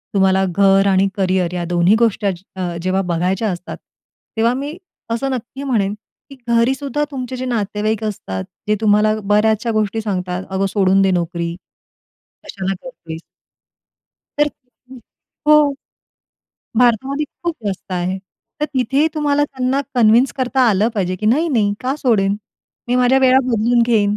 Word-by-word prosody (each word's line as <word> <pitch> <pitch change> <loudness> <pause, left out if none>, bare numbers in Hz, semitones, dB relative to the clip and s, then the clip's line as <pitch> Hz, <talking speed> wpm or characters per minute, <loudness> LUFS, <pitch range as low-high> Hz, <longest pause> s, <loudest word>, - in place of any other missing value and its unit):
तुम्हाला 190 0 +3
घर 195 +2 +3
आणि 190 +1 +3
करियर 185 -2 +1
या 175 -1 -2
दोन्ही 175 +3 +4
गोष्टी 225 -3 +1
अचि 185 -2 -3
अ, 180 -2 -3
जेव्हा 185 +1 +1
बघायच्या 185 +6 0
असतात, 180 0 -7 0.6
तेव्हा 230 +2 +3
मी 285 +5 -5 0.3
असं 270 +4 -1
नक्की 260 +2 -5
म्हणेन, 215 -8 0 0.4
की 275 - -11
घरीसुद्धा 265 +5 +1
तुमचे 260 -2 -5
जे 255 - -4
नातेवाईक 215 -2 -1
असतात, 95 - -4 0.2
जे 210 - +3
तुम्हाला 215 0 +3
बऱ्याचशा 215 +3 +2
गोष्टी 215 +1 0
सांगतात, 185 -3 -3
"अगं 190 +1 0
सोडून 195 -1 +3
दे 195 -1 +3
नोकरी, 170 -1 -2 0.9
कशाला 195 0 -3
करतेस?" 165 -11 -8 1.2
तर 295 - +4 0.4
हं 260 - -9 0.5
हो. 300 -1 +6 1.1
भारतामध्ये 255 +5 +2 0.2
खूप 340 -1 -1
जास्त 190 -1 -4
आहे. 180 +1 -1 0.4
तर - - +2
तिथेही 270 +4 +2
तुम्हाला 290 -1 +2
त्यांना 265 -1 -1
कन्विन्स 240 +2 +4
करता 260 0 0
आलं 210 +1 +2
पाहिजे, 185 -3 -1
की 210 - -3
नाही-नाही 240 -5 +2
का 260 +2 -1
सोडेन? 205 -7 +2 0.5
मी 245 - +2
माझ्या 250 +1 +4
वेळा 260 0 +5
बदलून 235 0 +2
घेईन. 210 -3 +2
215 Hz, 145 wpm, -18 LUFS, 190-255 Hz, 1.2 s, हो